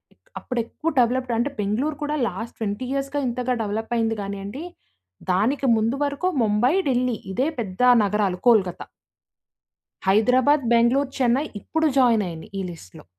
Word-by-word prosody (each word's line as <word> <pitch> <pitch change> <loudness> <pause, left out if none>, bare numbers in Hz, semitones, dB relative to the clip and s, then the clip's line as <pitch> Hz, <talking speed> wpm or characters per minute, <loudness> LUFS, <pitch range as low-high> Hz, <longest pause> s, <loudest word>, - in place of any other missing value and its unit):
ఇక్ - - -36
అప్పుడెక్కువు 250 +6 -3
డవలప్‌డ్ 245 0 +1
అంటే, 260 +5 0
బెంగుళూరు 255 +10 -1
కూడా 300 +1 -1
లాస్ట్ 200 +5 -6
20 220 +3 -3
ఇయర్స్‌గా 275 +1 -2
ఇంతగా 250 +1 -1
డెవలప్పయింది 225 +1 -1
గానీయండి. 200 +7 -6 0.7
దానికి 235 +10 +1
ముందు 225 +4 0
వరకు 285 +6 -2 0.2
ముంబై, 215 +7 +2 0.2
ఢిల్లీ 250 -2 +1 0.2
ఇదే 260 +6 +1
పెద్దా 220 +5 +1 0.2
నగరాలు 200 -3 0
కోల్‌కత్తా. 200 -7 +3 1.2
హైదరాబాద్, 255 +8 +4
బెంగుళూరు, 245 +4 +3
చెన్నై 255 +3 +2 0.2
ఇప్పుడు 320 +7 -1
జాయినయినియి 210 -10 +1
ఈ - - -2
లిస్ట్‌లో. 160 - -13
235 Hz, 125 wpm, -23 LUFS, 210-265 Hz, 1.2 s, హైదరాబాద్